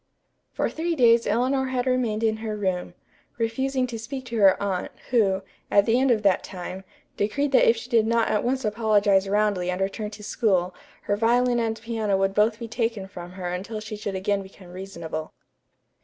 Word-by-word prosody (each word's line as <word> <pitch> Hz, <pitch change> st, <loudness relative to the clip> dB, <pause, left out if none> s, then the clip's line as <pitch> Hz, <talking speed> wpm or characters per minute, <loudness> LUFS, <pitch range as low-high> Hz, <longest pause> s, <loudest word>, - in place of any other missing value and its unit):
For -, -, -1 dB
three 335 Hz, +1 st, -2 dB
days 235 Hz, -4 st, +5 dB
Eleanor 260 Hz, +5 st, +1 dB
had 255 Hz, -1 st, -1 dB
remained 240 Hz, -4 st, 0 dB
in 220 Hz, -1 st, +2 dB
her 220 Hz, -1 st, -4 dB
room, 185 Hz, -3 st, -2 dB, 0.4 s
refusing 255 Hz, +3 st, 0 dB
to 235 Hz, -2 st, -6 dB
speak 260 Hz, +3 st, -6 dB
to 235 Hz, -2 st, -4 dB
her 195 Hz, -2 st, +6 dB
aunt, 190 Hz, -3 st, -2 dB, 0.2 s
who, 195 Hz, -6 st, +2 dB, 0.3 s
at 200 Hz, 0 st, +4 dB
the 230 Hz, +2 st, +3 dB
end 270 Hz, +1 st, +3 dB
of 220 Hz, -3 st, +2 dB
that 195 Hz, -2 st, +3 dB
time, 185 Hz, 0 st, -7 dB, 0.3 s
decreed 275 Hz, +8 st, 0 dB
that 265 Hz, -, +5 dB
if 230 Hz, -, +3 dB
she 225 Hz, -, -7 dB
did 230 Hz, -3 st, +3 dB
not 230 Hz, 0 st, +2 dB
at 210 Hz, -, +1 dB
once 260 Hz, 0 st, -1 dB
apologize 205 Hz, -3 st, +2 dB
roundly 205 Hz, -3 st, +1 dB
and 180 Hz, +1 st, -2 dB
return 200 Hz, +2 st, -2 dB
to 210 Hz, 0 st, -11 dB
school 190 Hz, -4 st, +1 dB, 0.3 s
her 205 Hz, -, 0 dB
violin 240 Hz, +3 st, +2 dB
and 225 Hz, -1 st, -1 dB
piano 220 Hz, -3 st, -1 dB
would 195 Hz, 0 st, +1 dB
both 215 Hz, +2 st, +2 dB
be 230 Hz, 0 st, -6 dB
taken 225 Hz, -4 st, -2 dB
from 175 Hz, -2 st, -9 dB
her 185 Hz, -1 st, -5 dB
until 195 Hz, +5 st, -4 dB
she 215 Hz, 0 st, -6 dB
should 205 Hz, -2 st, -4 dB
again 200 Hz, +1 st, 0 dB
become 190 Hz, -1 st, -13 dB
reasonable. 170 Hz, -4 st, -6 dB
215 Hz, 195 wpm, -25 LUFS, 195-235 Hz, 0.4 s, her